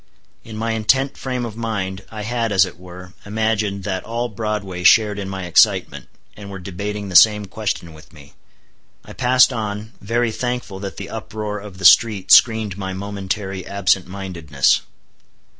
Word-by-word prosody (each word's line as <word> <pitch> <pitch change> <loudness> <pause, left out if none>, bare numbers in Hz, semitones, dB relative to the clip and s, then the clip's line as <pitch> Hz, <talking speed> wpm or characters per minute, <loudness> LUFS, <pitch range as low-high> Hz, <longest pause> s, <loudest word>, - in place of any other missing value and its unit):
In 110 -1 -9
my 115 +1 -2
intent 130 +5 +1
frame 125 -2 -4
of 110 -2 -7
mind, 100 -4 -4
I 110 -1 -7
had, 115 0 -2
as 95 -1 +5
it 90 -1 -11
were, 90 +1 -12
imagined 105 -2 -1
that 95 -1 -3
all 120 +1 -3
Broadway 105 -4 -4
shared 105 +3 +4
in 95 -1 -5
my 95 -1 -5
excitement, 95 +2 +2 0.3
and 100 -1 -10
were 100 - -7
debating 100 +2 -5
the 90 - -7
same 105 +3 +6
question 95 -5 -4
with 75 0 -16
me. 75 -3 -16 0.7
I - - -11
passed 125 +1 +4
on, 105 -1 -4
very 115 +3 0
thankful 120 -5 -4
that 100 0 -7
the - - -7
uproar 105 -1 -5
of 100 -2 -11
the 95 - -5
street 100 0 +5
screened 110 -2 +5
my 95 -1 -4
momentary 95 0 -4
absent 95 -2 0
mindedness. 85 -7 0
100 Hz, 165 wpm, -20 LUFS, 95-110 Hz, 0.7 s, same